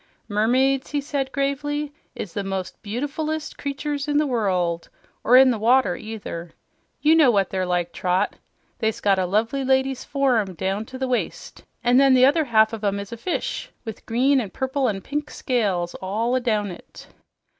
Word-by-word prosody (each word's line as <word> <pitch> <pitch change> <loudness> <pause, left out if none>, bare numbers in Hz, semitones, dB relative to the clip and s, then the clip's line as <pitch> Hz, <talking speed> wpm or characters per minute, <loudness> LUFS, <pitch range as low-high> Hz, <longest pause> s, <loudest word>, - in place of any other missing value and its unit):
"Mermaids," 255 +6 +2
he 295 - -1
said 280 -2 -3
gravely, 290 +1 -2 0.2
"is 185 - -6
the 200 - -2
most 190 -1 -4
beautiful 280 +9 -3 0.3
creatures 285 +1 -3
in 290 0 +1
the 300 - +3
world 185 -9 0 0.3
or 255 +3 +7
the 245 -4 +2
water, 230 -4 +3
either. 200 -6 -7 0.5
You 305 +1 +6
know 315 -5 +6
what 200 -5 +2
they're 185 -1 -1
like, 175 -1 -1
Trot, 180 0 0 0.4
they's 220 -1 -1
got 195 -2 +2
a 185 - 0
lovely 225 +8 0
lady's 265 0 +1
form 245 -9 +1
down 195 +5 -2
to 260 +3 -9
the 260 0 -2
waist, 250 -1 -3 0.2
an' 245 +1 +4
then 270 -1 +6
the 255 0 +6
other 305 +3 +3
half 220 -3 +4
of 220 -1 -6
'em's 200 -1 -2
a 235 - -6
fish, 355 +10 -3 0.2
with 220 -2 -8
green 260 +4 +3
an' 210 - -5
purple 265 +3 -1
an' 195 -2 -3
pink 295 +7 -4
scales 195 -9 -1
all 225 +7 0
down 215 -5 0
it." 175 - -12
240 Hz, 175 wpm, -23 LUFS, 200-275 Hz, 0.5 s, or